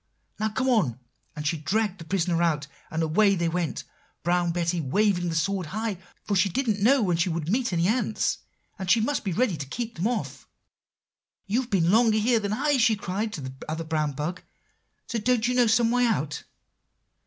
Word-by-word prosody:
'Now 215 +1 +1
come 260 +5 -1
on;' 185 - +2 0.4
and 150 - -6
she 160 +2 0
dragged 200 +5 -1
the 165 - -9
prisoner 170 -1 0
out. 155 -4 +1 0.2
And 160 0 -1
away 195 +6 +3
they 170 -2 0
went, 165 -5 -2 0.4
Brown 175 +1 +1
Betty 170 0 -1
waving 175 +4 +1
the 165 - -3
sword 185 +1 0
high; 215 +1 -3 0.2
for 205 - -1
she 195 +1 +3
didn't 220 -1 -1
know 255 +3 +4
when 175 -4 +1
she 175 +2 +1
would 165 0 -2
meet 245 0 +1
any 170 0 +1
ants, 220 -1 0 0.4
and 190 -1 -4
she 225 - +5
must 280 +6 0
be 195 - -2
ready 210 0 +1
to 140 - -5
keep 235 - -4
them 180 +6 0
off. 240 -1 -4 1.0
"'You've 235 +5 -1
been 190 -5 +2
here 170 - +3
longer 225 +1 +4
than 205 -1 -3
I,' 280 +6 +1
she 230 -3 +4
cried 205 +2 -3
to 160 - -5
the 130 -1 -6 0.2
other 160 +1 -3
brown 155 -2 -1
bug; 155 +6 -4 0.7
'don't 235 +1 +1
you 250 - +1
know 245 -1 +4
some 230 +1 +3
way 245 0 +3
out? 150 -9 -2
195 Hz, 200 wpm, -26 LUFS, 165-225 Hz, 1.0 s, she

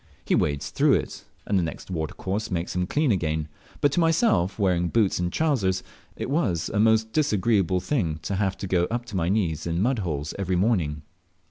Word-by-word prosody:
He - - +1
wades 70 -1 0
through - - +3
it, - - -2 0.2
and 100 -2 +1
the - - +1
next 85 +3 -6
watercourse 95 +5 -3
makes 85 -1 -3
him 90 0 0
clean 150 +2 +1
again; 80 -5 -1 0.3
but 145 - +4
to 160 - +1
myself, 165 - +2
wearing 90 -4 +1
boots 105 0 +1
and 90 0 -1
trousers, 115 -13 +1 0.3
it - - -4
was 105 - 0
a 105 - -1
most 110 0 +3
disagreeable 105 - +2
thing 90 - -1
to 95 +3 -2
have 95 -1 0
to - - -5
go 90 -1 +2
up 120 +4 -3
to 105 - -8
my 85 -2 0
knees 85 -6 0
in 85 0 -1
a - - 0
mud 120 +4 +1
hole 75 -7 -2
every 95 -1 0
morning. 90 -7 +1
95 Hz, 205 wpm, -25 LUFS, 85-110 Hz, 0.3 s, but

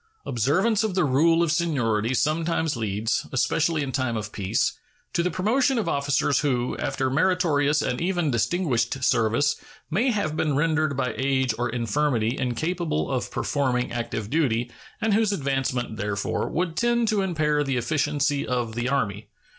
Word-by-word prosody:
Observance 185 - +1
of 210 -4 -1
the 185 - +3
rule 165 +5 +3
of 165 - +1
seniority 130 -9 0
sometimes 160 +1 0
leads, 110 0 -1
especially 155 +4 +1
in 135 - -4
time 130 -4 -1
of 105 -1 -5
peace, 95 -2 0 0.4
to 170 - +2
the 180 - 0
promotion 245 - +1
of 225 - -1
officers 140 0 +1
who, 125 -4 0
after 130 - -1
meritorious 150 -3 +2
and 125 - -2
even 175 -4 0
distinguished 125 - 0
service, 125 +3 +2 0.3
may 220 - +2
have 200 -10 -1
been 155 -3 0
rendered 155 -1 +1
by 125 -2 -1
age 130 -2 +1
or 120 0 0
infirmity 120 0 0
incapable 155 +5 -2
of 125 -2 -2
performing 125 -1 -1
active 115 -2 -4
duty, 125 -6 +1 0.3
and 220 -1 +2
whose 215 0 +3
advancement, 135 - -1
therefore, 100 -1 -2
would 170 -1 -2
tend 235 +1 +1
to 210 -2 +2
impair 155 -5 +1
the 135 -2 -1
efficiency 145 +1 0
of 120 -3 -1
the 120 +2 -2
Army. 105 -6 -2
140 Hz, 155 wpm, -25 LUFS, 120-165 Hz, 0.4 s, the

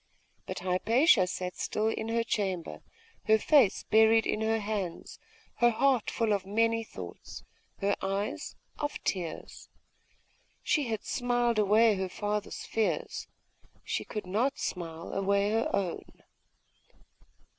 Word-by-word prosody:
But - - -5
Hypatia 190 - +3
sat 180 0 -4
still 215 +1 -1
in 220 0 -3
her 230 0 +1
chamber, 190 -6 -2 0.4
her 220 0 +5
face 265 -3 +4
buried 220 0 +5
in 215 - -1
her 220 0 +1
hands, 205 -5 -4 0.4
her 240 - +5
heart 250 0 +2
full 225 -2 +1
of 200 -2 0
many 225 +3 +1
thoughts; 90 - -9 0.4
her 200 +1 +2
eyes 200 +10 -3 0.2
of 290 -1 -2
tears. 175 -4 -4 0.9
She 295 -5 +1
had 220 -2 -3
smiled 245 -2 0
away 215 +2 +5
her 190 0 -2
father's 210 +2 -3
fears; 420 - -2 0.6
she - - -2
could 210 -3 -6
not 220 +9 0
smile 165 -2 -5
away 200 +1 +1
her 225 +1 +1
own. 185 -4 -3
215 Hz, 125 wpm, -29 LUFS, 195-230 Hz, 0.9 s, her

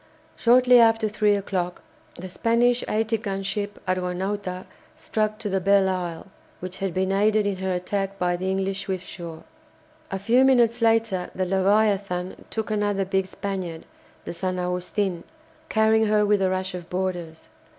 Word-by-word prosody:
Shortly 250 +1 +5
after 225 -1 +4
three 210 0 +2
o'clock 185 -3 -3 0.3
the 185 - -7
Spanish 235 +6 +2
80 220 +1 0
gun 195 -3 -4
ship 205 +1 -3
"Argonauta" 185 +1 -2 0.3
struck 215 -1 -1
to 220 -1 -5
the 190 -1 0
"Belleisle," 185 -3 +1 0.3
which 185 +1 -7
had 195 -1 -1
been 185 +2 0
aided 210 +2 +2
in 200 -2 -1
her 190 0 -2
attack 195 +2 -2
by 180 -1 0
the 185 +2 -3
English 195 0 -2
"Swiftsure." 175 -3 -6 0.7
A 195 - -3
few 235 +6 +3
minutes 240 -3 +4
later 225 -5 +2
the 185 - 0
"Leviathan" 195 -1 +1
took 220 -1 -3
another 205 -2 0
big 190 0 0
Spaniard, 185 -4 -5 0.4
the - - -5
"San 185 +1 -2
Agustino," 180 0 -2 0.5
carrying 220 0 +3
her 210 0 +3
with 205 -1 +2
a 190 - +2
rush 185 0 -2
of 175 -1 -7
boarders. 180 -3 -4
195 Hz, 150 wpm, -24 LUFS, 185-215 Hz, 0.7 s, Shortly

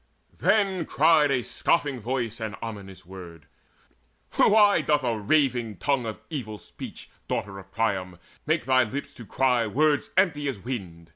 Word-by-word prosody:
Then 190 -6 +2
cried 155 -1 +4
a 130 -3 +1
scoffing 145 -2 0
voice 120 0 -3
an 110 -3 -4
ominous 100 -5 -8
word: 85 -5 -11 0.9
"Why 205 -4 +5
doth 150 -1 +1
a 120 -2 0
raving 120 -3 +1
tongue 130 - 0
of 110 - -6
evil 110 -8 -5
speech, - - -11 0.2
Daughter 95 -1 -3
of 95 - -15
Priam, 95 -5 -1 0.3
make 160 +1 +1
thy 130 -1 +4
lips 140 +5 -5
to 115 -6 -12
cry 125 -3 +1
Words 145 +5 +1
empty 150 -7 +2
as 135 - -2
wind? 95 -7 -7
125 Hz, 150 wpm, -26 LUFS, 105-145 Hz, 0.9 s, Why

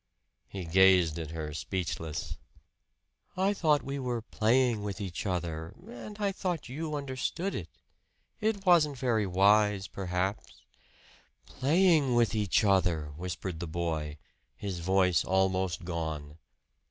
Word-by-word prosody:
He 95 -3 -6
gazed 90 -2 +5
at 80 -2 -5
her, 80 -2 -5
speechless. 80 -2 -4 1.0
"I 195 +2 +2
thought 155 -6 +2
we 140 +1 -4
were 120 -3 -2
playing 120 0 +2
with 100 -2 -4
each 95 0 -4
other; 85 -3 -3
and 215 -3 -9
I 205 -2 0
thought 180 -6 -3
you 155 +3 -4
understood 140 +7 -3
it. - - -4 0.7
It 210 -3 -1
wasn't 155 -6 +4
very 115 -5 +1
wise, 100 +1 +3
perhaps 95 +1 -3 0.4
" - - -29
"Playing 155 -3 +3
with 120 -3 +3
each 105 -1 +2
other!" 90 -7 +2
whispered 90 0 -5
the 85 - -4
boy, 80 -2 -3 0.4
his 95 -4 -5
voice 90 0 +3
almost 95 -2 0
gone. 80 -3 -4
95 Hz, 130 wpm, -30 LUFS, 85-130 Hz, 1.0 s, gazed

